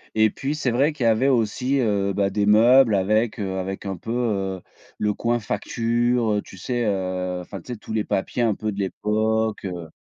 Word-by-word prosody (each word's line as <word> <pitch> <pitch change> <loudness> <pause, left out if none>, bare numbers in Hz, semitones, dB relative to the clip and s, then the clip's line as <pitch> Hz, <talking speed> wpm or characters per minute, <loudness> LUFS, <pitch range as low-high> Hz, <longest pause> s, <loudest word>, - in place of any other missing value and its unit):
et 110 0 +4
puis 140 +7 -3
c'est 140 -5 -1
vrai 140 +6 +2
qu'il 145 - -4
y - - +4
avait 115 +4 +3
aussi, 130 +2 +1
heu, 100 -5 +1
bah, 100 0 +1
des 100 +1 0
meubles 115 +2 +6
avec, 110 +4 +1
heu, 95 -2 -3
avec 95 +2 -5
un 95 -1 -3
peu, 115 - -7
heu, 100 -6 -1 0.4
le 105 0 0
coin 120 +3 0
facture, 115 +2 0
heu, 105 - 0
tu 95 - -14
sais? 120 +5 -2
Heu, 90 -2 -2
enfin 95 +2 -8
tu 125 - -7
sais - - -7
tous 110 - -8
les 110 -1 +1
papiers 95 +5 -1
un 115 -3 +2
peu 110 +1 -3
de 100 - -7
l'époque, 110 +2 -1
heu 90 -3 -5
110 Hz, 215 wpm, -23 LUFS, 100-120 Hz, 0.4 s, meubles